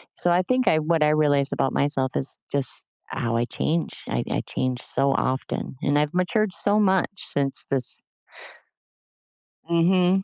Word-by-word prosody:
So 175 - 0
I 175 +1 +4
think 255 +7 0
I 155 - +4
what 160 0 +1
I 150 - +4
realized 145 -2 +2
about 135 - 0
myself 135 -2 0
is 135 - 0
just 140 -2 -1 0.2
how 115 -1 -3
I 120 - +1
change. 160 +6 -2
I - - -1
I - - 0
change 130 -1 -2
so 140 0 +1
often, 130 0 -2
and 145 +1 +2
I've 150 +1 -1
matured 195 +3 +1
so 205 +1 +2
much 190 -3 +2
since 140 -6 -1
this 135 -3 +2 1.7
Mhm. 180 +2 +3
150 Hz, 160 wpm, -24 LUFS, 135-180 Hz, 1.7 s, I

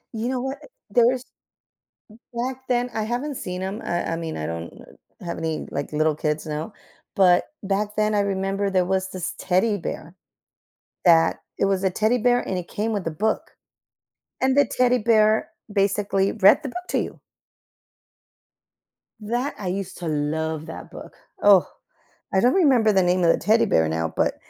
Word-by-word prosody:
You 230 +3 -2
know, 260 -1 -1
what, 270 +2 -4 0.3
there's 245 +1 +3 1.1
back 255 +2 -4
then, 245 0 +1
I 220 - -1
haven't 245 +6 -3
seen 180 -4 -5
'em. 195 +4 -4
I 175 -1 -2
I - - -1
mean, 165 -1 -5
I 75 - -3
don't 85 0 -5 0.5
have 170 -2 -5
any, 160 -1 -3
like, 140 +2 -4
little 155 0 +2
kids 150 +1 -2
now, 155 +7 -4 0.4
but 180 +2 +4
back 205 +2 -1
then 215 0 +1
I 205 - +3
remember 195 0 -1
there 185 -2 +2
was 190 +1 -1
this 180 -2 -4
teddy 195 +3 +1
bear, 170 -1 -6 0.9
that 165 -1 +5 0.2
it - - +2
was 195 -1 +1
a 190 - +3
teddy 220 +6 +1
bear, 245 +2 +3
and 185 - -2
it 175 - -6
came 220 +2 -2
with 200 -5 -3
a - - 0
book. 215 +8 -2 0.9
And 260 +1 +2
the 285 - +6
teddy 250 +1 +2
bear 215 -1 +3 0.2
basically 195 -1 +1
read 200 +4 +5
the 275 - -3
book 360 +6 -7
to - - +1
you. - - -5 2.0
That, 240 +6 -2
I 190 - -5
used 190 0 -4
to 170 - -5
love 155 +1 -2
that - - -9
book, - - -10 0.3
oh, 200 -3 +6 0.7
I 190 - +4
don't 245 +4 +4
remember 260 - +4
the 190 -2 +3
name 180 0 +2
of 165 - +6
the - - +1
teddy 220 +2 +3
bear 80 -1 +2
now, 80 0 -2
but - - +1
195 Hz, 175 wpm, -23 LUFS, 170-230 Hz, 2.0 s, the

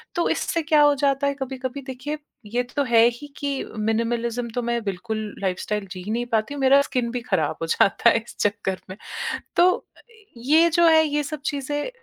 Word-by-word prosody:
तो 345 - +1
इससे 335 - 0
क्या 305 -1 +4
हो 290 -1 +5
जाता 280 0 +1
है 280 - +1
कभी-कभी, 265 0 -5
देखिए, 265 +4 -4 0.3
ये 240 +4 -1
तो 250 +4 -2
है 230 -3 +5
ही 265 +5 -10
कि 280 -2 -2 0.2
मिनिमलिज़्म 230 +2 -1
तो 245 - 0
मैं 235 0 -1
बिल्कुल 215 +3 -3 0.2
लाइफस्टाइल 195 +2 -2
जी 185 -1 -6
ही 205 - -4
नहीं 240 +2 -1
पाती 220 +5 +1
हूँ, 285 - -5
मेरा 270 +1 +6
स्किन 250 -4 -1
भी 245 0 -3
खराब 190 -10 0
हो 165 - -2
जाता 200 +7 +4
है 230 - +3
इस 230 +1 -7
चक्कर 205 -2 -1
में। 185 - -8 0.6
तो 355 +1 +6
अ, - - -16 0.4
ये 310 +8 +4
जो 340 +1 +4
है, 320 -1 +6
ये 295 0 0
सब 295 0 -6
चीज़ें, 290 - -2
250 Hz, 205 wpm, -23 LUFS, 225-285 Hz, 0.6 s, मेरा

